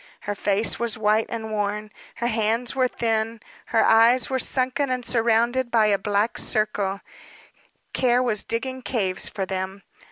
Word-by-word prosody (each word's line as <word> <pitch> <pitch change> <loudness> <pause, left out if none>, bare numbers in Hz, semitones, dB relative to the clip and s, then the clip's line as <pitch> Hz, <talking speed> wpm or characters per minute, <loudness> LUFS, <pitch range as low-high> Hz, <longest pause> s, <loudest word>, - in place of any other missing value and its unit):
Her 205 - -3
face 205 +2 0
was 235 -2 -1
white 215 +1 +2
and 220 -1 -5
worn, 210 0 -2 0.2
her 235 - -4
hands 230 +2 0
were 255 -1 +3
thin, 225 -1 -1 0.3
her 225 - +2
eyes 230 +3 +4
were 260 - 0
sunken 260 +2 0
and 250 -1 -2
surrounded 235 +2 +1
by 225 -2 +3
a 205 -2 +2
black 205 +3 0
circle 205 -3 0 0.9
care 250 -1 +2
was 215 -5 +1
digging 260 +3 -3
caves 200 -8 -1
for 195 - -4
them. 190 +1 -5
225 Hz, 155 wpm, -23 LUFS, 210-240 Hz, 0.9 s, eyes